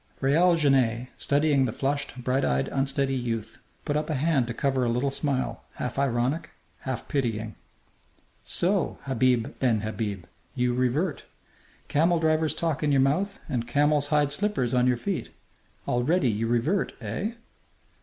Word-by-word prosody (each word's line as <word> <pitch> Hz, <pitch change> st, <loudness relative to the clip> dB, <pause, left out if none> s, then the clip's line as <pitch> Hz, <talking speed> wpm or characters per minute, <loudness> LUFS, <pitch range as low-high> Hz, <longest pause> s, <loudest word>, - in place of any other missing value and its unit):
Raoul 165 Hz, +6 st, +4 dB
Genet, 130 Hz, -6 st, +2 dB
studying 145 Hz, -1 st, +2 dB
the 120 Hz, -, -1 dB
flushed, 140 Hz, 0 st, -3 dB
bright 130 Hz, +2 st, +1 dB
eyed, 65 Hz, +1 st, +1 dB
unsteady 135 Hz, 0 st, 0 dB
youth, 115 Hz, -3 st, -3 dB, 0.3 s
put 145 Hz, -, -1 dB
up 150 Hz, +1 st, -1 dB
a 155 Hz, -, 0 dB
hand 140 Hz, -3 st, +1 dB
to 120 Hz, -, -3 dB
cover 135 Hz, -1 st, +1 dB
a 120 Hz, -, +1 dB
little 125 Hz, +4 st, 0 dB
smile, 135 Hz, -2 st, -2 dB
half 125 Hz, +2 st, -4 dB
ironic, 140 Hz, +4 st, 0 dB, 0.3 s
half 130 Hz, -3 st, -5 dB
pitying. 115 Hz, -5 st, -1 dB, 0.9 s
"So, 185 Hz, -1 st, +1 dB
Habib 125 Hz, -3 st, +1 dB
ben 115 Hz, -5 st, +2 dB
Habib, 105 Hz, -4 st, -4 dB, 0.3 s
you 125 Hz, 0 st, +1 dB
revert! 135 Hz, +7 st, 0 dB, 0.6 s
Camel 170 Hz, +4 st, +3 dB
driver's 160 Hz, -1 st, +1 dB
talk 165 Hz, -4 st, -1 dB
in 150 Hz, -1 st, +1 dB
your 140 Hz, -, +4 dB
mouth 160 Hz, +10 st, +1 dB
and 120 Hz, -2 st, -2 dB
camel's 145 Hz, +1 st, +2 dB
hide 145 Hz, -1 st, +2 dB
slippers 145 Hz, -, 0 dB
on 125 Hz, 0 st, +3 dB
your 125 Hz, -1 st, +2 dB
feet. 195 Hz, +7 st, -3 dB, 0.6 s
Already 130 Hz, +5 st, +2 dB
you 110 Hz, +2 st, -1 dB
revert! 120 Hz, -, +1 dB
Eh?" 135 Hz, -, -3 dB
135 Hz, 150 wpm, -26 LUFS, 120-150 Hz, 0.9 s, Raoul